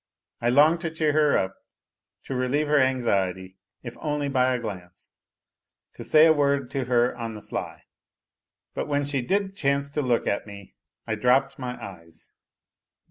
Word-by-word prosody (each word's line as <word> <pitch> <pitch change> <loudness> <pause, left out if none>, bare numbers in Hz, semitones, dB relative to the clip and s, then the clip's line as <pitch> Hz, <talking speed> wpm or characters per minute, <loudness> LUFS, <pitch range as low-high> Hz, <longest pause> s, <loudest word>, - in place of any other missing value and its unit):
I 120 - +1
longed 150 +6 +4
to 170 - -2
cheer 155 -2 0
her 150 -1 +3
up, 95 0 -1 0.7
to - - -6
relieve 130 +4 0
her 150 -1 +4
anxiety 95 -8 0 0.3
if 120 -2 -7
only 150 -2 -2
by 130 -1 +2
a 125 - +1
glance; 90 -6 -9 0.8
to - - -9
say 155 0 +6
a 160 - +6
word 140 -3 0
to 135 -2 -2
her 120 0 +2
on 115 -2 -6
the - - -7
sly. - - -6 0.9
But - - -3
when 145 -1 0
she 140 -2 -1
did 195 +8 -1
chance 140 -4 0
to 150 - -1
look 125 -4 0
at 100 - -2
me 100 -1 -11 0.3
I 110 - -2
dropped 130 +5 +2
my 125 -1 -5
eyes. 85 -4 -12
130 Hz, 170 wpm, -25 LUFS, 115-145 Hz, 0.9 s, say